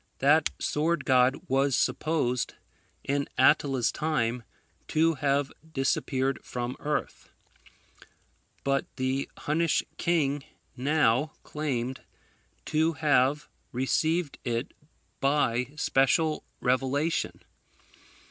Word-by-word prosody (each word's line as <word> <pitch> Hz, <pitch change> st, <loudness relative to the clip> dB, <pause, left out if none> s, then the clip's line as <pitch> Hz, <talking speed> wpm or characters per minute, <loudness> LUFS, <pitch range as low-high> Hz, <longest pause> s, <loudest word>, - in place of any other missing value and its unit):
That 150 Hz, +3 st, +4 dB
sword 165 Hz, +3 st, 0 dB
God 130 Hz, 0 st, +4 dB
was 135 Hz, 0 st, +2 dB
supposed, 135 Hz, -6 st, 0 dB, 0.5 s
in 140 Hz, 0 st, -1 dB
Attila's 130 Hz, -3 st, +3 dB
time, 125 Hz, -6 st, -1 dB, 0.5 s
to 165 Hz, +1 st, +3 dB
have 140 Hz, -1 st, 0 dB, 0.2 s
disappeared 135 Hz, -1 st, 0 dB
from 125 Hz, +1 st, -4 dB
earth; 150 Hz, 0 st, -3 dB, 1.3 s
but 135 Hz, 0 st, 0 dB
the 130 Hz, +1 st, -1 dB
Hunnish 160 Hz, +2 st, +1 dB, 0.2 s
king 145 Hz, -5 st, +1 dB, 0.3 s
now 140 Hz, +1 st, +2 dB
claimed 130 Hz, -4 st, -3 dB, 0.6 s
to 160 Hz, +1 st, +1 dB
have 150 Hz, -2 st, +2 dB, 0.2 s
received 155 Hz, +5 st, 0 dB
it 120 Hz, +1 st, -2 dB, 0.5 s
by 130 Hz, -3 st, +1 dB
special 150 Hz, +2 st, +2 dB, 0.2 s
revelation. 135 Hz, +5 st, 0 dB
140 Hz, 85 wpm, -28 LUFS, 130-155 Hz, 1.3 s, That